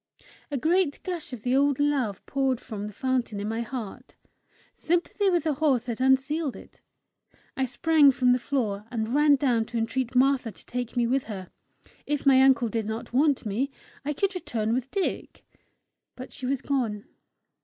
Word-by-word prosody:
A 285 - -2
great 325 +2 +1
gush 350 -6 -5
of 240 -4 -8
the 250 +1 +1
old 280 0 +3
love 275 -9 0
poured 270 -3 0
from 210 -5 -6
the - - -7
fountain 245 -1 -1
in 205 - -3
my 225 +1 -2
heart: 245 0 -7 0.6
sympathy 350 +4 0
with 350 -2 +1
the 315 -2 +1
horse 270 -4 +1
had 235 0 -4
unsealed 265 +3 +2
it. - - -14 0.7
I 265 - 0
sprang 295 +4 +4
from 250 -1 +3
the 250 - +3
floor, 220 -6 -2
and 225 0 -3
ran 295 0 +5
down 245 -5 +1
to 235 +1 -5
entreat 245 +2 -2
Martha 260 -2 +3
to - - -18
take 245 0 -4
me 240 - +3
with 260 +3 0
her: 190 -5 -7 0.6
if 295 -1 -1
my 265 -1 +6
uncle 260 -3 +4
did 220 -1 -2
not 225 +2 -5
want 280 -1 +2
me, 225 +7 -1 0.3
I 295 +1 -2
could 395 +7 0
return 225 - -2
with 255 +2 -2
Dick! 390 +3 -3 0.7
But 255 - -9
she 255 - -5
was 270 -1 -1
gone. 230 -7 -1
260 Hz, 180 wpm, -26 LUFS, 230-285 Hz, 0.7 s, my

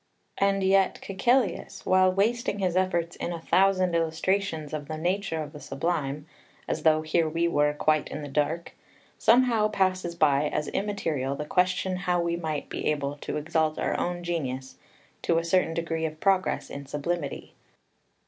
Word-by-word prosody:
And 195 0 +2
yet 190 0 +3
Caecilius, 215 +2 0
while 185 0 +4
wasting 210 +3 0
his 185 -3 0
efforts 175 -2 0
in - - -3
a 170 - -4
thousand 185 +1 +3
illustrations 165 -1 0
of 150 -2 -4
the 155 0 -4
nature 175 -1 -1
of 150 - -10
the 150 - -9
Sublime, 150 -2 -2 0.4
as - - -2
though 155 -1 +3
here 160 +1 +1
we 165 +2 +1
were 150 -3 +2
quite 155 0 +2
in 150 - -6
the - - -5
dark, 150 +4 -1 0.5
somehow 230 -2 +4
passes 185 -4 0
by 150 -2 +3
as 150 - -2
immaterial 160 -10 -2
the 150 - -4
question 185 +2 +1
how 180 -1 0
we 170 0 0
might 160 -3 -3
be - - -4
able 145 -1 -1
to - - -4
exalt 155 +1 0
our - - -1
own 175 0 -2
genius 130 -7 -3 0.5
to 165 - +1
a 165 - +1
certain 170 -1 +1
degree 165 -1 -1
of 155 0 -9
progress 190 0 +1
in 140 -1 -7
sublimity. 145 +1 -3
170 Hz, 165 wpm, -27 LUFS, 155-185 Hz, 0.5 s, while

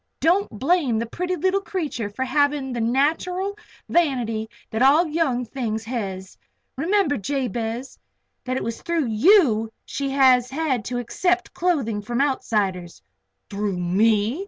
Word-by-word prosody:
Don't 360 +6 +2
blame 275 - +2
the 230 - -1
pretty 360 +10 -3
leetle 375 +4 +1
creetur 300 - -3
for 260 +6 -3
havin' 285 -1 +1
the 240 - -2
nateral 325 - 0 0.3
vanity 240 -10 0 0.2
that 220 - -2
all 290 +6 +6
young 300 -6 0
things 225 -2 -3
hez. 195 -5 -5 0.4
Remember, 330 0 +1
Jabez, 240 +1 -3 0.4
that 255 0 -2
it - - -3
was 230 0 -4
through 335 -3 0
you 235 - +4
that 220 - -13
she 275 -1 -3
has 260 -2 +4
had 270 -4 -1
to 245 - -3
accept 355 +9 -1
clothing 275 -12 0
from 235 +3 -3
outsiders." 205 -10 -1 0.4
"Through 200 -2 -2
me?" 180 +2 -1
260 Hz, 140 wpm, -23 LUFS, 225-320 Hz, 0.4 s, all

